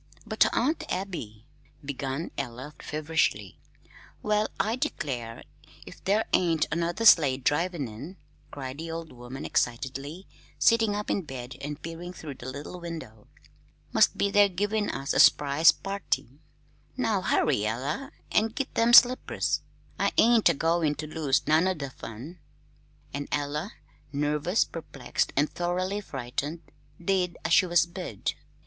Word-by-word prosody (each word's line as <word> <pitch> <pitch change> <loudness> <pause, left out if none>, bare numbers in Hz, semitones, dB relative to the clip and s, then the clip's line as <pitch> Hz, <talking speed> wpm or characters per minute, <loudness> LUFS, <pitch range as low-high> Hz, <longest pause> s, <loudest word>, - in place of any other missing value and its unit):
"But, 220 0 +3
Aunt 310 +6 0
Abby 145 - -5 0.2
" 145 - -23
began 140 +2 -4
Ella, 130 +2 -5
feverishly. 150 - -1 0.6
"Well, 210 0 +2
I 215 +4 +1
declare, 130 - -4 0.4
if - - -13
there 205 +3 +2
ain't 165 -3 +3
another 170 +7 -1
sleigh 145 -10 +7
drivin' 150 +2 0
in," 140 - -9 0.3
cried 135 0 -7
the 165 +1 -5
old 165 0 -6
woman 125 +1 -8
excitedly, 135 +8 -2 0.3
sitting 225 -3 +4
up 210 0 -3
in 200 - +1
bed 130 -5 -8
and 145 +1 -5
peering 165 +2 -7
through 155 -5 -7
the 130 -1 -10
little 145 +6 -7
window. 160 -11 -8 0.7
"Must - - +4
be 200 - +1
they're 205 0 +5
givin' 205 +3 -1
us 135 - -2
a - - +1
s'prise 145 +3 +6
party. 195 - -4 0.6
Now - - +1
hurry, 105 +1 +2
Ella, 140 - -3 0.2
an' 215 - +3
git 260 +5 -4
them 230 +1 +3
slippers. 250 +1 +5 0.4
I - - +1
ain't 230 -1 +6
a - - +2
goin' 165 0 +1
to 155 - -5
lose 155 -3 0
none 160 +4 +4
o' 185 - +1
the 140 -4 -6
fun!" 130 +9 -9 0.7
And 145 +1 -4
Ella, 150 +7 -2 0.4
nervous, 150 +6 +1
perplexed, 155 -5 -3
and 145 +2 +3
thoroughly 185 +4 -2
frightened, 140 +1 -4 0.4
did 180 -1 0
as - - +2
she 185 - +6
was 175 -1 +4
bid. 170 - -4
160 Hz, 145 wpm, -27 LUFS, 135-190 Hz, 0.7 s, sleigh